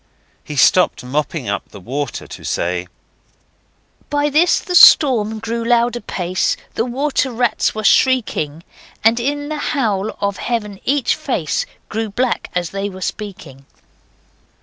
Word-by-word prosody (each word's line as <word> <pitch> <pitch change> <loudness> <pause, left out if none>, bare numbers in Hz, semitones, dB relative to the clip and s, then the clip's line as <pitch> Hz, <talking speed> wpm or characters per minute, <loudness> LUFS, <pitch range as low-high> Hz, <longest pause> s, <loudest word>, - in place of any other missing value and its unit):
He 150 - -7
stopped 175 +2 +3
mopping 145 +1 -3
up 100 0 -3
the 100 - -11
water 135 +9 -4
to - - -11
say: 90 +1 -2 1.2
'By 290 0 0
this 325 +5 +4
the 360 - -6
storm 235 -10 +6
grew 230 +1 -3
loud 240 0 +2
apace, 185 -5 -1 0.2
The 225 - -1
water 265 +1 -1
rats 240 -1 0
were 215 - -4
shrieking, 200 - +2 0.4
And 225 +2 +4
in 290 +4 -2
the 305 - -3
howl 220 -9 -1
of 200 -1 -1
Heaven 210 -5 -3
each 280 -1 +2
face - - -2 0.2
Grew 220 0 -3
black 240 +4 -1
as 175 -1 -1
they 195 +1 -3
were 190 -1 -10
speaking. 165 -10 -7
215 Hz, 140 wpm, -18 LUFS, 175-255 Hz, 1.2 s, storm